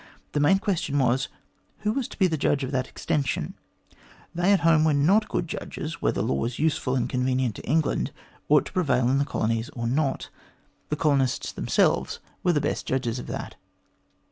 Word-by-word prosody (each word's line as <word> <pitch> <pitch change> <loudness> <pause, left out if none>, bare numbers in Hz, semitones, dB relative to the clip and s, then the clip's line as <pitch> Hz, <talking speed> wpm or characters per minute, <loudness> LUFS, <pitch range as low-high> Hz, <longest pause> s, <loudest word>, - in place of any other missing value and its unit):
The 150 - 0
main 150 +7 +5
question 180 -8 -1
was, 130 0 +2 0.5
Who 210 - +1
was 265 -1 -1
to - - -12
be 190 - +4
the 165 -3 +1
judge 145 -1 +1
of 130 - -3
that 130 -2 -1
extension? 145 - -2 0.8
They 175 +3 +2
at 200 - +4
home 165 -2 +5
were 155 -2 +3
not 195 +10 +3
good 170 - -1
judges 160 0 -6
whether - - +1
laws 115 - -1
useful 150 -4 0
and 125 -2 +1
convenient 125 -2 0
to - - -10
England 155 0 +1 0.4
ought - - +5
to - - -9
prevail 140 -9 +2
in 135 - +3
the 140 - +2
colonies 115 -2 -1
or 115 - -3
not. 135 +3 0 0.6
The 150 - 0
colonists 140 -6 +1
themselves - - +1 0.2
were 180 - +2
the 150 - +2
best 145 - -2
judges 125 -2 -1
of - - -8
that. - - -6
145 Hz, 185 wpm, -26 LUFS, 130-165 Hz, 0.8 s, main